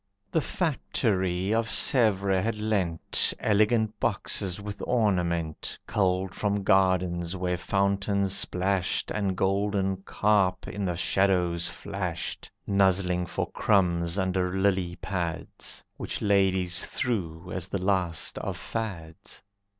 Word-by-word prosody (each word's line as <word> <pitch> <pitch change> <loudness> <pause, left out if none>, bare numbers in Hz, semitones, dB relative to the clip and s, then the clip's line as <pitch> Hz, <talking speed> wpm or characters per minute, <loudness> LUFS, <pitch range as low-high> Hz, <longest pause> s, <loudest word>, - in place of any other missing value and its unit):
The 160 - +2
factory 100 - 0
of 115 0 +1
Sevres 100 -6 +3
had 115 -1 -1
lent 100 -6 +1
Elegant 110 +1 +2
boxes 95 0 0
with 100 0 -7
ornament 90 -9 0
Culled 95 -1 0
from 100 -1 -1
gardens 90 -2 +2
where 90 -1 -1
fountains 100 +1 0
splashed 95 0 0
And 100 -3 -1
golden 95 0 +1
carp 95 -1 +1
in 100 -1 -3
the 90 -2 -1
shadows 90 -3 +1
flashed, 90 -4 -4 0.2
Nuzzling 95 -2 +2
for - - -3
crumbs 85 -3 +2
under 95 -1 0
lily 95 -3 +1
pads, 90 -3 -3
Which - - -4
ladies 95 -4 +2
threw 90 -8 -2
as 90 0 -2
the 100 - -2
last 90 -3 0
of - - -4
fads. 100 -3 -5
95 Hz, 110 wpm, -27 LUFS, 90-100 Hz, 0.2 s, Sevres